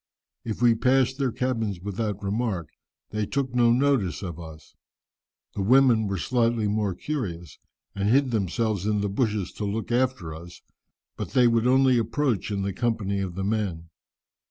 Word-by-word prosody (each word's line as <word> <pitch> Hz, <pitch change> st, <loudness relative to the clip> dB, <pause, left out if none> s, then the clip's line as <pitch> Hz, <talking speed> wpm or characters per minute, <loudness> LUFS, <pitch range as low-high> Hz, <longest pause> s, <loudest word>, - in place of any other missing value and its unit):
If 115 Hz, +1 st, -4 dB
we 120 Hz, -1 st, +6 dB
passed 130 Hz, +3 st, +2 dB
their 135 Hz, -3 st, +1 dB
cabins 115 Hz, -7 st, -2 dB
without 100 Hz, +1 st, -4 dB
remark, 100 Hz, -, -2 dB, 0.4 s
they 105 Hz, -1 st, -2 dB
took 135 Hz, -3 st, -2 dB
no 120 Hz, -1 st, +4 dB
notice 125 Hz, -7 st, +1 dB
of 85 Hz, -3 st, -6 dB
us. 80 Hz, -2 st, -11 dB, 0.8 s
The -, -, -3 dB
women 120 Hz, 0 st, +4 dB
were 100 Hz, -1 st, -2 dB
slightly 115 Hz, +1 st, +1 dB
more 105 Hz, -2 st, 0 dB
curious, 90 Hz, -, -5 dB, 0.3 s
and 100 Hz, +1 st, -1 dB
hid 135 Hz, +2 st, +3 dB
themselves 105 Hz, -1 st, -1 dB
in 105 Hz, -1 st, +1 dB
the 100 Hz, -, -1 dB
bushes 105 Hz, -2 st, -1 dB
to -, -, -6 dB
look 105 Hz, +3 st, -3 dB
after 125 Hz, -10 st, 0 dB
us, 85 Hz, +2 st, -11 dB, 0.5 s
but -, -, -5 dB
they 125 Hz, -2 st, +5 dB
would 115 Hz, 0 st, +2 dB
only 130 Hz, -1 st, +4 dB
approach 115 Hz, -, -1 dB
in 100 Hz, -2 st, -2 dB
the 100 Hz, 0 st, -2 dB
company 100 Hz, -3 st, -1 dB
of 95 Hz, -3 st, -4 dB
the 95 Hz, -, -3 dB
men. 95 Hz, -6 st, -2 dB
110 Hz, 165 wpm, -25 LUFS, 95-125 Hz, 0.8 s, we